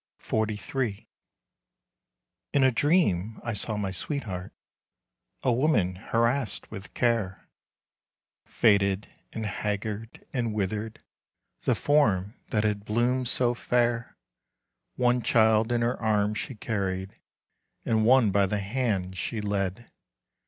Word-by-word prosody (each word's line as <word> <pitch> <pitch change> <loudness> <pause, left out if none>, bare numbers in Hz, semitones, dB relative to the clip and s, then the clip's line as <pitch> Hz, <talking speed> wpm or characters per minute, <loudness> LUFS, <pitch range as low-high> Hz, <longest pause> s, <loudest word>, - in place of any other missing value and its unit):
XLIII. 110 +1 -2 1.5
In 140 - +4
a 130 - +5
dream 115 - +2
I 120 - -2
saw 105 +1 -1
my 100 -2 -2
sweetheart, 95 - -4 0.9
A 125 - +3
woman 110 - +2
harassed 115 +5 -1
with 95 -3 -9
care; 115 -6 0 1.0
Faded, 100 -2 +2 0.2
and 110 - -4
haggard, 105 +2 -4
and 115 -4 -1
withered, 105 +2 -3 0.6
The - - +3
form 110 -10 +2 0.2
that 105 -2 +1
had 105 -1 0
bloomed 120 +4 +1
so 120 0 +2
fair. 120 -1 0 0.8
One 125 0 +2
child 110 0 +3
in 120 -1 +1
her 120 +1 0
arms 105 -1 +1
she 130 - -5
carried, 95 -3 -3 0.7
And 110 -1 +2
one 120 -2 +5
by 100 0 +3
the 105 - -1
hand 100 -4 -1
she 110 - -3
led. 100 +1 -2
110 Hz, 115 wpm, -27 LUFS, 100-120 Hz, 1.5 s, a